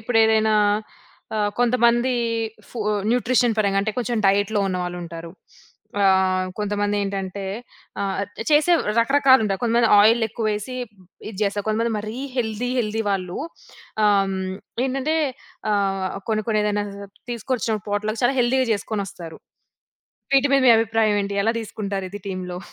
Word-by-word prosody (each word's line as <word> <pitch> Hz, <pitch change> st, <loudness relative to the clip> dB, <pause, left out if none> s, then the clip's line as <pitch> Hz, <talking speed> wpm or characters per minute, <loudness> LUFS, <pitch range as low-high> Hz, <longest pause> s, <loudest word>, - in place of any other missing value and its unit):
ఇప్పుడు 225 Hz, +1 st, +1 dB
ఏదైనా 220 Hz, 0 st, +3 dB, 0.8 s
ఆహ్, 205 Hz, -1 st, +1 dB
కొంతమంది 240 Hz, +1 st, +3 dB, 0.6 s
ఫు 240 Hz, -, -8 dB, 0.3 s
న్యూట్రిషన్ 245 Hz, -1 st, +2 dB
పరంగా 200 Hz, -2 st, +2 dB
అంటే, 215 Hz, +1 st, -2 dB
కొంచెం 240 Hz, 0 st, -1 dB
డైట్‌లో 205 Hz, +1 st, +2 dB
ఉన్న 185 Hz, -, -2 dB
వాళ్లుంటారు. 170 Hz, -1 st, -7 dB, 0.7 s
ఆహ్, 190 Hz, -1 st, +3 dB
కొంతమంది 205 Hz, 0 st, -1 dB
ఏంటంటే, 195 Hz, 0 st, -4 dB, 0.6 s
ఆహ్, 195 Hz, -1 st, -1 dB, 0.3 s
చేసే 310 Hz, +4 st, +4 dB, 0.3 s
రకరకాలు 265 Hz, +1 st, +5 dB
ఉండా 195 Hz, -2 st, 0 dB
కొంతమంది 235 Hz, 0 st, +3 dB
ఆయిలేక్కువేసి 220 Hz, +1 st, +1 dB, 0.5 s
ఇది 210 Hz, -, -9 dB
చేస్తారు. 205 Hz, +1 st, -1 dB
కొంతమంది 225 Hz, +1 st, 0 dB
మరీ 215 Hz, +3 st, -6 dB, 0.2 s
హెల్తీ, 230 Hz, 0 st, -1 dB
హెల్తీ 220 Hz, 0 st, -2 dB
వాళ్ళు 185 Hz, -2 st, -2 dB, 0.7 s
ఆహ్మ్, 195 Hz, -2 st, +2 dB
హ్మ్, 185 Hz, 0 st, -4 dB, 0.3 s
ఏంటంటే 270 Hz, +5 st, -1 dB, 0.6 s
ఆహ్, 195 Hz, -1 st, -1 dB
కొన్ని, 215 Hz, -1 st, 0 dB
కొన్ని 215 Hz, -1 st, +2 dB
ఏదైనా 205 Hz, 0 st, 0 dB, 0.5 s
తీసుకొచ్చినప్పుడు 225 Hz, -3 st, -2 dB
పాట్‌లక్ 215 Hz, +2 st, -2 dB
చాలా 270 Hz, +3 st, +3 dB
హెల్తీగా 255 Hz, +1 st, +2 dB
చేసుకొనొస్తారు. 195 Hz, -5 st, -5 dB, 1.0 s
వీటి 275 Hz, +1 st, +4 dB
మీద 275 Hz, -, +4 dB
మీ -, -, +9 dB
అభిప్రాయం 225 Hz, -1 st, +2 dB
ఏంటి? 200 Hz, 0 st, -4 dB
ఎలా 225 Hz, -, +3 dB
తీసుకుంటారు 200 Hz, -3 st, -4 dB
ఇది 205 Hz, -, -7 dB
టీమ్‌లో? 180 Hz, -1 st, -5 dB
215 Hz, 130 wpm, -22 LUFS, 195-235 Hz, 1.0 s, మీ